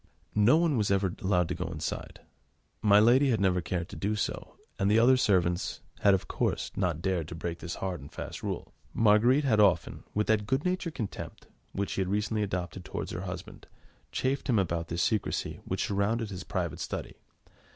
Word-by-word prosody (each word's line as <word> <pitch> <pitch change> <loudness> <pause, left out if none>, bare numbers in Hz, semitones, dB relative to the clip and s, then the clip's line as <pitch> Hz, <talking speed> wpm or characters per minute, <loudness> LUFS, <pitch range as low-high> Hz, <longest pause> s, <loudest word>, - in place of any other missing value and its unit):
No 105 +8 +5
one 165 -5 +2
was 105 -3 +1
ever 95 -2 +1
allowed 90 -3 +2
to - - -1
go 90 0 -4
inside. 80 -2 -5 0.6
My 105 -1 +6
lady 125 +6 +5
had 115 - +2
never 90 -2 +2
cared 85 0 -3
to - - -8
do 105 +2 -1
so, 105 - -3 0.2
and 95 - +2
the 105 - +4
other 120 +3 +6
servants 90 -7 +1 0.2
had, 100 -1 +5
of 95 - -4
course, - - -1
not 85 -4 -1
dared 90 -5 0
to 85 - -7
break 85 +1 -4
this 85 0 -5
hard 90 -5 -4
and 70 +2 -11
fast - - -7
rule. - - -4 0.2
Marguerite 115 +6 +5
had 115 -6 +3
often, 95 -6 +3
with 105 +1 +2
that 105 -2 +1
good 135 - 0
natured 180 -3 -1
contempt 110 -7 -6 0.3
which 100 0 -2
she - - -1
had 95 - 0
recently 105 +2 0
adopted 90 -2 -3
towards - - -5
her 85 - -4
husband, 90 -2 -7 0.4
chaffed 135 +2 -1
him 120 - +4
about 85 -3 0
this 85 0 -1
secrecy 110 -3 -1
which 95 - -1
surrounded 105 +2 0
his 90 - -6
private - - -3
study. - - -5
100 Hz, 195 wpm, -29 LUFS, 90-110 Hz, 0.6 s, My